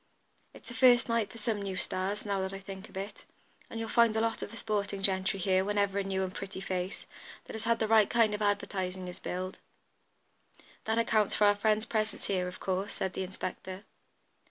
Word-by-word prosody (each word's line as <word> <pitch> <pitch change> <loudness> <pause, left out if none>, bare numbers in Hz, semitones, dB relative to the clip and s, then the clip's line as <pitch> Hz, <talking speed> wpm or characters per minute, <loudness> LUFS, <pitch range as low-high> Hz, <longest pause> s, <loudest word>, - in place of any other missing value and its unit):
"It's - - -10
a - - -5
first 245 -1 +6
night 230 -3 +1
for 230 - -10
some 215 -1 -1
new 195 -1 -3
'stars,' 195 +4 -1
now 200 -2 0
that 190 0 -3
I 195 - -5
think 195 0 -9
of - - -10
it, 200 +2 -6 0.4
and 225 - -5
you'll 225 - -2
find 230 -1 +4
a - - +3
lot 225 0 0
of - - -4
the 230 - -9
sporting 200 -2 -2
gentry 190 +1 +2
here 185 0 +3
whenever 200 0 +1
a - - 0
new 190 0 -1
and 185 0 -3
pretty 195 -1 -6
face, 185 0 -3 0.4
that - - -9
has 220 0 -5
had 230 0 +3
the 220 - 0
right 220 -1 +5
kind 225 -3 +4
of 210 - -3
advertising, 190 -3 -1
is 180 - -6
billed. 185 +1 -4 1.3
That 220 +1 +1
accounts 220 -3 +2
for 210 - +4
our 205 0 +6
friend's 215 +1 +2
presence 215 -2 -1
here, 185 -2 0
of 180 - -7
course," 190 +2 -1
said 190 -1 -2
the - - -3
inspector. 185 +1 -5
200 Hz, 215 wpm, -31 LUFS, 190-220 Hz, 1.3 s, first